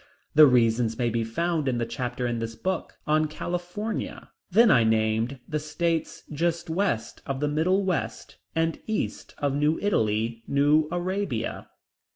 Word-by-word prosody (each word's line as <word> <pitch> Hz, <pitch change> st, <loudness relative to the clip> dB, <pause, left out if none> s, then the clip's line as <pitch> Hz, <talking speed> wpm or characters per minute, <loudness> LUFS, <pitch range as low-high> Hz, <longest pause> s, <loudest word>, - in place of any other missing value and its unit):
The 155 Hz, 0 st, +9 dB
reasons 115 Hz, -2 st, +3 dB
may 120 Hz, -1 st, 0 dB
be 115 Hz, 0 st, 0 dB
found 155 Hz, +6 st, -1 dB
in 125 Hz, -2 st, +1 dB
the 120 Hz, -, 0 dB
chapter 125 Hz, +1 st, -3 dB
in 120 Hz, -1 st, -1 dB
this 115 Hz, 0 st, -4 dB
book 185 Hz, +4 st, -3 dB
on 155 Hz, +1 st, +2 dB
California. 175 Hz, +7 st, -4 dB, 0.2 s
Then 220 Hz, +4 st, +6 dB
I 120 Hz, -, +5 dB
named 110 Hz, +3 st, +1 dB
the 155 Hz, -, -1 dB
states 165 Hz, +2 st, -2 dB
just 170 Hz, +2 st, -1 dB
west 165 Hz, -, -1 dB
of 135 Hz, -1 st, -2 dB
the 150 Hz, -, 0 dB
Middle 180 Hz, +7 st, +1 dB
West, 180 Hz, -3 st, -3 dB, 0.2 s
and 165 Hz, 0 st, 0 dB
east 220 Hz, -1 st, -3 dB
of 140 Hz, -2 st, 0 dB
New 150 Hz, +3 st, +2 dB
Italy, 115 Hz, -, 0 dB
New 145 Hz, +2 st, +3 dB
Arabia. 175 Hz, -, -2 dB
150 Hz, 155 wpm, -26 LUFS, 120-175 Hz, 0.2 s, The